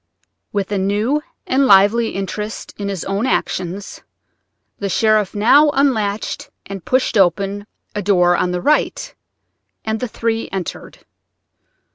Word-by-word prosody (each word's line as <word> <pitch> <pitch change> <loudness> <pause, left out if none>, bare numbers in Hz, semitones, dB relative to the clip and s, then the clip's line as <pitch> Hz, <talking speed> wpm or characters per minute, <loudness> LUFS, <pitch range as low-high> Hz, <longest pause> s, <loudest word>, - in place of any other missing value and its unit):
With 200 -1 -2
a 200 - 0
new 210 +10 0 0.2
and 270 +1 +2
lively 210 +3 +4
interest 210 +3 -5
in 200 -1 -3
his 195 -4 -4
own 200 +5 -1
actions 185 -2 -2 0.8
the 200 - -2
sheriff 215 +1 +2
now 265 +9 +5
unlatched 220 -7 0 0.2
and 195 -3 -7
pushed 255 -4 +1
open 195 +3 +1 0.3
a 205 - -2
door 180 -3 +3
on 180 - 0
the 180 0 -2
right, 305 - 0 0.7
and 220 0 -1
the 250 - -2
three 225 0 -2
entered. 190 -3 -6
205 Hz, 130 wpm, -19 LUFS, 195-230 Hz, 0.8 s, now